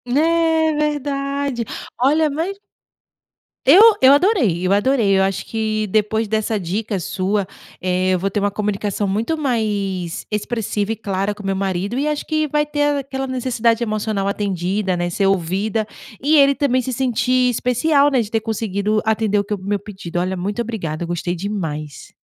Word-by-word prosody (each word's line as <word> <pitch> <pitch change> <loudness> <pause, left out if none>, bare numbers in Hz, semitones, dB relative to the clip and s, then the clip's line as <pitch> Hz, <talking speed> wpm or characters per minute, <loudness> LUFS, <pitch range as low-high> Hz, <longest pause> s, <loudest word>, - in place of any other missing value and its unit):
É 320 +1 +3
verdade. 280 -3 -2 0.3
Olha 300 +4 +3
mas 330 +7 -3 1.1
eu 325 +10 +8 0.2
eu 265 +1 +8
adorei 285 - +2
eu 185 - +1
adorei. 205 -1 +3
Eu 190 - +3
acho 195 -1 -1
que 215 -1 -2
depois 220 +2 +1
dessa 220 0 -1
dica 200 +3 -2
sua, 190 +3 -1 0.3
eh, 185 0 +1
eu 185 - +1
vou 195 +2 -1
ter 205 - -1
uma 205 0 0
comunicação 205 0 -2
muito 225 +11 -1
mais 205 - -2
expressiva 210 -1 -2
e - - -1
clara 200 -1 -2
com 210 - -11
meu 195 0 0
marido, 195 +3 -2
e 285 +3 0
acho 300 -1 -2
que 310 -1 0
vai 295 +1 +1
ter 290 -1 0
aquela 270 0 -4
necessidade 240 -2 0
emocional 215 -2 -1
atendida, 195 -1 -1
né? 175 0 -1
Ser 195 +3 +1
ouvida, 195 +4 0 0.4
e 300 +3 +3
ele 280 0 +5
também 265 -3 +1
se 255 +1 -4
sentir 255 0 +1
especial, 280 +5 +2
né, 255 - +3
de 215 -1 -6
ter 225 - 0
conseguido 215 -1 -1
atender 220 -1 +1
o - - 0
que 205 - -4
é - - +1
o - - -13
meu 200 +1 -1
pedido. 190 -4 -6
Olha, 185 +1 -1
muito 205 +6 -2
obrigada, 175 -9 -4
eu - - -4
gostei 175 +1 -2
demais. 160 -7 -5
215 Hz, 175 wpm, -20 LUFS, 195-265 Hz, 1.1 s, eu